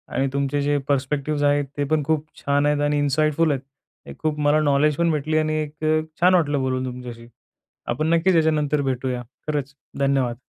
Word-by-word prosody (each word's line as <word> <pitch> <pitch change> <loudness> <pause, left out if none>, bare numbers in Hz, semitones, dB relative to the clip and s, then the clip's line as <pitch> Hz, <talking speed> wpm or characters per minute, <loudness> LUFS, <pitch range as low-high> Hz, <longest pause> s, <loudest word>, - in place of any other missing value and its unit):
आणि 135 - +1
तुमचे 140 +1 0
जे 145 0 +1
पर्स्पेक्टिव्हज 145 +1 -1
आहेत, 145 0 +2
ते 145 - 0
पण 150 +1 0
खूप 155 +1 0 0.2
छान 145 +1 +1
आहेत 145 0 +1
आणि 145 0 +1
इनसाईटफुल 155 +2 +2
आहेत. 135 -2 -1 0.5
एक - - -10
खूप 155 -1 -2
मला 145 +1 +3
नॉलेज 145 0 +2
पण 170 -1 +2
भेटली 155 +1 0
आणि 155 0 +1
एक 150 +1 -11
अ, 155 0 +2 0.2
छान 180 +1 +5
वाटलं 145 -5 +2
बोलून 130 0 -1
तुमच्याशी. 125 -2 -8 0.6
आपण 155 +6 -1
नक्कीच 170 +2 +3
याच्यानंतर 150 -2 +2
भेटूया. 130 -2 -2 0.2
खरंच 145 -2 -3 0.2
धन्यवाद. 135 -4 +1
145 Hz, 180 wpm, -23 LUFS, 140-155 Hz, 0.6 s, छान